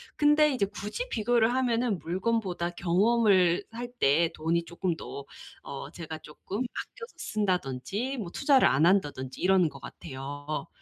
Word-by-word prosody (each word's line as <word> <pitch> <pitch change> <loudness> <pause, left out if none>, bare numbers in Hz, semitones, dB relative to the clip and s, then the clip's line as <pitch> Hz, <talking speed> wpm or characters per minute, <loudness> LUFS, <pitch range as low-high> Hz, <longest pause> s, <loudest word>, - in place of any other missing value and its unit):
근데 300 0 +5
이제 245 -7 0
굳이 210 - -5
비교를 235 - +2
하면은 240 -4 +1
물건보다 185 +1 -1
경험을 185 0 +3
할 240 +1 -6
때 160 +4 +3
돈이 165 +2 0
조금 170 0 -2
더 140 -3 -8 0.4
어 140 - -7
제가 160 -2 -7
조금 185 +7 -7
아껴서 460 - -6
쓴다든지 200 - -2
뭐 205 -7 -4
투자를 275 +3 +4
안 155 +4 +3
한다든지 145 -8 +1
이러는 185 -3 +4
것 140 - -12
같아요. 145 +1 -6
185 Hz, 300 characters per minute, -28 LUFS, 160-235 Hz, 0.4 s, 근데